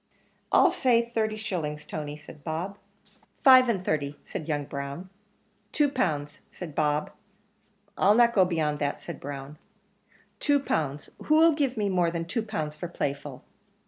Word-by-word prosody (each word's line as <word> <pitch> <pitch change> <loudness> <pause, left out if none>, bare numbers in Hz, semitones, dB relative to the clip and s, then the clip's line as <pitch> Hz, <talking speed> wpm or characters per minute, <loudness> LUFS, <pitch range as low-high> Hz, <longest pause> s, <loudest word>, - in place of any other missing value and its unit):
"I'll - - +6
say 235 -2 +2
thirty 215 -1 0
shillings, 155 -8 -4
Tony," 150 -1 -5
said 150 -1 -14
Bob. 170 +6 -4 0.6
"Five 255 -2 +8
and 190 -5 -1
thirty," 145 -2 -1
said 155 - -6
young 145 -2 -1
Brown. 140 +6 -6 0.6
"Two 295 -1 +2
pounds," 155 - -2
said 170 -5 -8
Bob. 150 0 0 0.9
"I'll 205 +2 +5
not 235 0 +5
go 195 - +5
beyond 155 -5 0
that," 145 -1 -1
said - - -8
Brown. 140 +1 -7 0.8
"Two 290 -1 +3
pounds 150 - -2
who'll 320 +2 +6
give 280 -5 -1
more 185 -5 +2
than 165 0 -3
two 230 +7 -2
pounds 155 -9 -4
for 175 - -5
Playful? 140 -4 -4
165 Hz, 145 wpm, -27 LUFS, 150-220 Hz, 0.9 s, Five